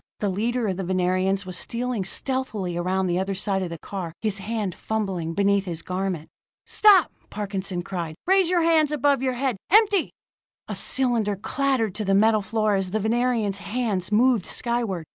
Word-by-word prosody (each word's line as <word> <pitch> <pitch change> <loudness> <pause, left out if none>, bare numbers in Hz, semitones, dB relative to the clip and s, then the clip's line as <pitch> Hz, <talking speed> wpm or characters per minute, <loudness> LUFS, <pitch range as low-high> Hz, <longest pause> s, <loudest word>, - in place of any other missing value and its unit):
The 205 - 0
leader 230 +5 -1
of 190 -3 -1
the 195 - -3
Venerians 185 +2 0
was 185 -1 -1
stealing 235 -4 -2
stealthily 215 -5 -2
around 185 +2 0
the 175 0 0
other 195 +1 -2
side 195 0 0
of 180 - -3
the 170 - -6
car, 175 -1 -6
his 210 -3 -2
hand 210 -2 -3
fumbling 190 -5 -3
beneath 200 0 +2
his 165 -3 -4
garment. 185 -3 -3 0.4
"Stop!" 400 -7 +5 0.2
Parkinson 195 -3 -4
cried. 170 -4 -5
"Raise 380 -1 +4
your 355 -2 +2
hands 320 -3 +3
above 285 -2 +2
your 260 -1 0
head 255 -3 -1
empty!" 410 -2 +4 0.6
A - - -4
cylinder 235 -6 +1
clattered 250 0 0
to 215 - -3
the 195 -1 +2
metal 215 +1 +4
floor 215 +1 0
as 195 -2 0
the 215 +4 -1
Venerian's 220 -2 0
hands 210 -4 -2
moved 230 -2 +3
skyward. 235 -8 -1
205 Hz, 175 wpm, -24 LUFS, 190-245 Hz, 0.6 s, Stop